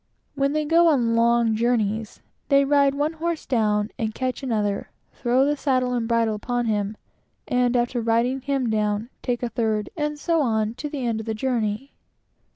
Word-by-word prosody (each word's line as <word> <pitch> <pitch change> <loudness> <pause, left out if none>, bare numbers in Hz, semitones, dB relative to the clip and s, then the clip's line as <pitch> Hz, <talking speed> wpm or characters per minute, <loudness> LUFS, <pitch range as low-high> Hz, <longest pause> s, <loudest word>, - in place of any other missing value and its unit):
When 275 0 0
they 305 0 0
go 335 +3 +4
on 240 -7 +3
long 230 -1 +3
journeys, 220 -2 -1 0.3
they 275 -1 +5
ride 280 -1 +3
one 295 +3 0
horse 330 0 -3
down, 210 -3 +1
and 220 -2 -2
catch 255 -1 -2
another, 210 -6 -1 0.2
throw 250 +2 +2
the 295 +1 +1
saddle 255 -3 0
and 235 -2 -1
bridle 230 -1 +2
upon 240 +3 -2
him, 210 -1 -1 0.5
and 250 -1 +2
after 240 0 0
riding 235 +4 +1
him 275 -2 -1
down, 210 +2 -1
take 245 -1 -2
a 240 - -1
third, 220 -3 -1
and 300 -1 -2
so 330 +1 +1
on 220 -4 0
to 295 +5 -6
the 280 -4 -4
end 230 -2 -1
of 220 - -7
the 220 - -1
journey. 235 +1 -2
240 Hz, 180 wpm, -24 LUFS, 220-275 Hz, 0.5 s, they